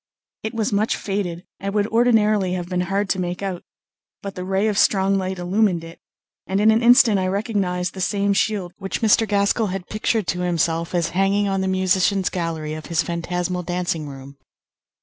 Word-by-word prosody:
It 220 +2 -5
was 220 -2 -1
much 210 +2 +1
faded 190 -3 -3
and 200 +1 -4
would 205 -1 +2
ordinarily 215 -5 +3
have 175 -1 -3
been 180 0 -1
hard 195 +3 -1
to 190 - 0
make 180 +1 -3
out; 185 -3 -3 0.6
but 200 -1 -5
the 180 - -6
ray 190 +3 0
of 210 -2 +1
strong 195 0 +3
light 190 0 -3
illumined 180 -1 +1
it, 165 0 -11 0.5
and 195 +1 0
in 215 +1 +5
an 220 +1 +2
instant 235 -4 +6
I 185 - 0
recognised 190 -3 -1
the 190 - -6
same 200 +1 +1
shield 195 -3 -1
which 195 +3 -4
Mr. 220 +1 +4
Gaskell 205 +2 +1
had 185 -1 -5
pictured 215 0 0
to 180 - -1
himself 170 -1 0
as 170 -2 +1
hanging 195 +2 +1
on 195 -1 0
the 190 - -1
musicians' 190 0 +2
gallery 165 -3 -3
of 155 0 -7
his 165 -1 +1
phantasmal 180 +1 -3
dancing 175 -3 -2
room. 135 0 -11
190 Hz, 190 wpm, -22 LUFS, 180-205 Hz, 0.6 s, instant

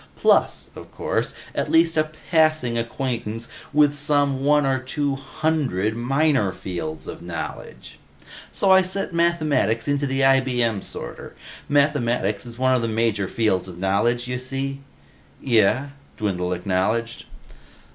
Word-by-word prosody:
Plus, - - +2
of - - -11
course, - - -2 0.2
at - - -2
least 165 0 +4
a 155 0 +1 0.2
passing 155 -7 +3
acquaintance 115 -1 -3 0.2
with 150 -1 +4
some 145 -2 +1
one 150 0 +4
or 135 -1 +1
two 140 +2 -2
hundred 135 - -1
minor 135 -2 +1
fields 85 -4 -6
of - - -7
knowledge. 85 -1 -7 0.5
"So 195 - +2
I 190 0 +7
set 185 0 -3
Mathematics 155 -10 +1
into 145 0 0
the 135 0 -1
IBM 125 -5 +2
sorter. - - -8 0.3
Mathematics 120 -7 +1
is 115 0 -10
one 130 0 +2
of 125 - +2
the 115 - -1
major 110 -3 0
fields 100 -4 0
of 90 -2 -9
knowledge, 105 +6 +1
you 125 0 -3
see." 135 +2 -3 0.6
"Yeh," 120 +3 +2 0.3
Dwindle 90 -4 -1
acknowledged. 100 +6 -1
130 Hz, 135 wpm, -23 LUFS, 110-145 Hz, 0.6 s, I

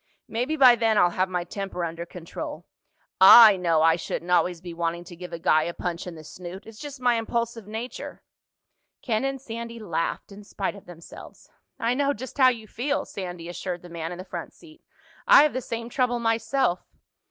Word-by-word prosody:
"Maybe 250 +7 -2
by 255 -3 +8
then 225 -2 +1
I'll 175 -2 +4
have 185 +1 0
my 180 -1 -2
temper 180 0 -4
under 170 +1 -6
control. 170 -1 -8 0.5
I 210 +2 +10
know 170 -4 +2
I 165 +1 +4
shouldn't 175 +1 -5
always 180 -1 +2
be 175 0 -8
wanting 170 0 -2
to 175 0 -12
give 180 +1 -9
a 170 - -5
guy 155 -1 +3
a 170 +2 -4
punch 175 0 -4
in 175 - -7
the 155 - -11
snoot. 180 +4 -9
It's 220 -1 -13
just 290 -2 -8
my 245 -2 +2
impulsive 230 -1 -3
nature." 225 +4 -7 0.8
Ken 225 -1 0
and 270 0 -2
Sandy 235 -2 -7
laughed 170 -3 -3
in 200 +1 -11
spite 200 -1 -4
of 200 -2 -14
themselves. 170 -2 -13 0.3
"I 230 +2 0
know 280 +2 +1
just 260 +4 -9
how 260 -1 +7
you 230 -3 -4
feel," 285 +7 -2
Sandy 175 -3 -7
assured 175 0 -5
the 175 - -11
man 165 0 -5
in 175 - -6
the 185 - -8
front 175 -3 -7
seat. 325 -1 -18 0.5
"I - - +9
have 300 - +1
the 255 - -2
same 230 -1 -5
trouble 245 0 0
myself." 225 -3 0
200 Hz, 200 wpm, -25 LUFS, 175-235 Hz, 0.8 s, I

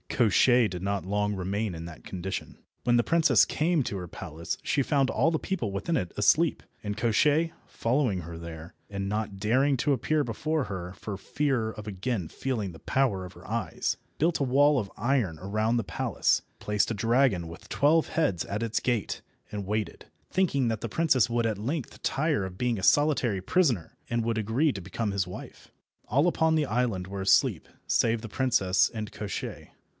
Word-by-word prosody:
Koshchei 120 +1 +4
did 90 -1 -6
not 100 -1 -1
long 105 +1 0
remain 100 +2 -2
in 80 0 -6
that 85 -2 -10
condition. 95 0 -5 0.3
When 120 -1 +3
the 120 - +3
princess 165 +3 +4
came 165 0 +1
to 100 - -3
her 90 -1 -6
palace 85 -1 -5
she 140 - +1
found 135 -1 +2
all 140 +9 +2
the 160 - 0
people 120 - -2
within 100 - -1
it 90 - -1
asleep, 155 +10 +3 0.2
and 105 0 -3
Koshchei, 145 +9 +2
following 115 -6 0
her 85 0 -8
there, 85 0 -8 0.2
and 100 -1 -3
not 105 -1 -2
daring 130 +7 +2
to 145 +3 +2
appear 150 +4 +1
before 145 +5 -1
her 90 -2 -5
for 100 +2 -6
fear 130 -1 -1
of 105 -1 -9
again 100 -2 -2
feeling 110 -2 -3
the 80 - -12
power 110 -9 0
of 90 - -10
her - - -14
eyes, - - -2 0.2
built 165 +2 +2
a - - +2
wall 140 +2 +4
of 100 -4 -5
iron 110 - 0
around 110 +4 0
the 115 - 0
palace, - - +1 0.2
placed 105 +1 0
a - - -1
dragon 115 -5 +2
with 85 - -11
twelve 155 +3 +3
heads 145 - +1
at 105 +3 -3
its 115 -1 0
gate, 120 -5 -1 0.3
and 105 -2 -4
waited, 105 +1 -3 0.2
thinking 150 -9 +1
that 110 -2 -1
the 115 - -3
princess 135 -5 +3
would 120 0 +1
at 110 -3 0
length 130 +6 -4
tire 150 -5 +1
of 95 -1 -6
being 120 0 0
a 95 - -6
solitary 130 -8 +3
prisoner, 125 - +1
and 115 -1 0
would 115 -1 0
agree 115 +8 +2
to 100 - -6
become 100 +4 -3
his 100 -1 0
wife. 90 - -10 0.4
All 140 - +3
upon 160 -2 +2
the 155 -2 +2
island 115 -7 -1
were 100 0 -5
asleep, 95 - +3 0.2
save 115 -1 +2
the 110 - -7
princess 105 -7 +2
and 110 -2 -5
Koshchei. 100 -3 -5
110 Hz, 190 wpm, -28 LUFS, 100-135 Hz, 0.4 s, Koshchei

